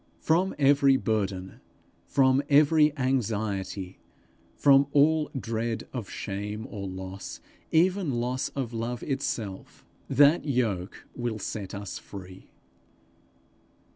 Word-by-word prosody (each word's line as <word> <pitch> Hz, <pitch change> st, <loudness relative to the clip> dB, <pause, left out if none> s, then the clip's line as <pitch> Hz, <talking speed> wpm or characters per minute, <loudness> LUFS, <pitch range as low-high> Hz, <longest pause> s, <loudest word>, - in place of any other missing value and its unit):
From 180 Hz, +4 st, +1 dB
every 140 Hz, -1 st, +5 dB
burden, 100 Hz, -5 st, -2 dB, 0.5 s
from 130 Hz, 0 st, +3 dB
every 150 Hz, +1 st, +5 dB
anxiety, 105 Hz, -7 st, -2 dB, 0.6 s
from 140 Hz, -1 st, +5 dB
all 150 Hz, +1 st, +4 dB
dread 115 Hz, -1 st, -3 dB
of 120 Hz, -6 st, -5 dB
shame 105 Hz, +2 st, -5 dB
or 100 Hz, -3 st, -5 dB
loss, 95 Hz, +1 st, -7 dB, 0.3 s
even 180 Hz, +1 st, +3 dB
loss 125 Hz, +2 st, -1 dB
of 130 Hz, -4 st, -3 dB
love 115 Hz, +1 st, -3 dB
itself, 115 Hz, -8 st, -4 dB, 0.2 s
that 145 Hz, +5 st, +5 dB
yoke 115 Hz, -10 st, -2 dB
will 120 Hz, -2 st, -3 dB
set 105 Hz, -1 st, -5 dB
us 100 Hz, -2 st, -6 dB
free. 95 Hz, -1 st, -11 dB
120 Hz, 105 wpm, -27 LUFS, 100-140 Hz, 0.6 s, every